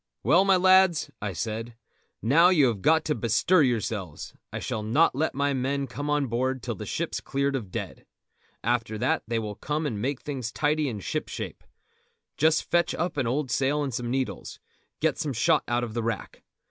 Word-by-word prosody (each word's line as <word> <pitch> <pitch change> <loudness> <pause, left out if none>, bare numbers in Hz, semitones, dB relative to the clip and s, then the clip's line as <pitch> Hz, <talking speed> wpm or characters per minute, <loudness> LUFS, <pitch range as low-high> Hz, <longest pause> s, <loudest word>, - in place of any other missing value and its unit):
"Well, 185 +3 +5
my 195 -1 +5
lads," 185 -2 +4
I 105 -1 -2
said, 115 +5 -4 0.5
"now 160 +10 +6
you 160 -7 +5
have 105 -5 -4
got 160 +6 +3
to 150 - +1
bestir 115 - +3
yourselves. 110 - -2 0.2
I - - -4
shall 110 - -3
not 120 +10 +3
let 150 +3 -1
my 140 +1 +1
men 135 +2 -1
come 140 +4 -5
on 150 -1 +2
board 130 +1 -1
till 120 - -2
the 100 - -8
ship's - - -3
cleared 140 0 -1
of 110 -8 -4
dead. - - -6 0.6
After 115 -2 0
that - - +1
they 115 0 -1
will 105 -2 -3
come 150 +8 -3
and 110 -8 -2
make 135 +2 -1
things 130 -6 -4
tidy 150 0 +1
and 105 -5 -6
shipshape. - - -4 0.7
Just 160 +2 +3
fetch 175 0 +1
up 175 +2 -2
an 135 -5 0
old 130 +1 -1
sail 140 +4 +1
and 135 -3 -3
some 120 0 -3
needles; 130 +1 -3 0.4
get - - +1
some 145 -3 -2
shot 150 +6 +2
out 120 0 0
of 115 -2 -5
the 120 - -1
rack. 115 0 -4
130 Hz, 195 wpm, -26 LUFS, 115-150 Hz, 0.7 s, now